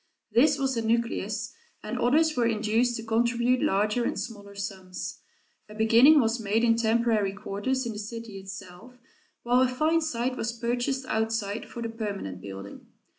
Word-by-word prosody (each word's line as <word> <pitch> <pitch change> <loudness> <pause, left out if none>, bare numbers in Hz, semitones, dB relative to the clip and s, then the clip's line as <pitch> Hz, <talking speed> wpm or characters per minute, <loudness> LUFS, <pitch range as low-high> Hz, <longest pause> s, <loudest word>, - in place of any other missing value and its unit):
This 285 +5 +4
was 270 -2 0
a 230 - 0
nucleus, 225 -1 -1 0.3
and 220 +4 -4
others 310 +6 +3
were 240 -2 +2
induced 225 +2 +1
to 225 - -5
contribute 235 +2 +1
larger 210 -3 +1
and - - -1
smaller 205 -4 -7
sums. 190 -2 -6 0.5
A 210 - -11
beginning 230 +8 +6
was 230 -1 +1
made 220 +1 0
in 230 -1 +4
temporary 225 -3 +2
quarters 210 +6 -2
in 235 - -2
the 210 - -6
city 220 -1 -7
itself, 195 +4 -10 0.5
while 245 +1 +3
a 260 - +5
fine 310 +6 +1
site 250 -4 -1
was 230 +1 -2
purchased 245 +3 -1
outside 220 -2 -2
for 235 - -6
the 230 - -3
permanent 200 - -5
building. 100 0 -9
230 Hz, 165 wpm, -27 LUFS, 210-245 Hz, 0.5 s, beginning